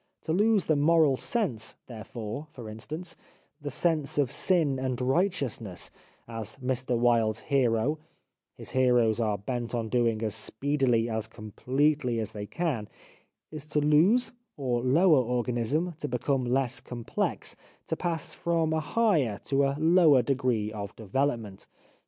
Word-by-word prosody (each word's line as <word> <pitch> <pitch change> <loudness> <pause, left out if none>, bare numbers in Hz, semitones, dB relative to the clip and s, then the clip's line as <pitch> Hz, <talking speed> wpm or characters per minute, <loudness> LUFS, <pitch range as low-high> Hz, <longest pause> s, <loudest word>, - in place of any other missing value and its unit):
To 160 - -1
lose 210 +1 +3
the 155 - +2
moral 155 -1 +4
sense 130 - -2
therefore, 115 +4 -7
for 120 -6 -9
instance, 155 +11 -7 0.5
the 145 - -4
sense 150 +1 0
of 140 -4 +2
sin 160 -8 +1
and 130 -2 -2
righteousness, 130 - -1 0.4
as 110 -2 -7
Mr 130 -1 -1
Wilde's 115 -2 +2
hero 135 +1 +1 0.3
— - - -58
his - - -10
heroes 125 -4 +3
are 105 -3 +1
bent 120 +4 -4
on 115 -2 -2
doing 115 -2 +1
as 110 -2 -1
speedily, 120 +1 0
as 110 -1 -3
completely 125 +4 0
as 110 -1 -3
they 105 -1 -6
can 140 -11 -2 0.3
— - - -45
is 155 -1 -8
to 150 - +1
lose, 160 +12 +4 0.3
or 125 -4 -1
lower 155 +5 +5
organism, 125 +7 -1
to 145 - -3
become 130 +1 0
less 125 0 0
complex, 120 -2 -3 0.3
to - - -2
pass 165 -2 -3
from 165 -2 0
a 160 - +1
higher 155 - +1
to 140 0 +1
a 135 0 0
lower 160 -4 +5
degree 125 -6 0
of 100 -2 -6
development. 115 -2 -2
130 Hz, 145 wpm, -28 LUFS, 115-155 Hz, 0.5 s, lower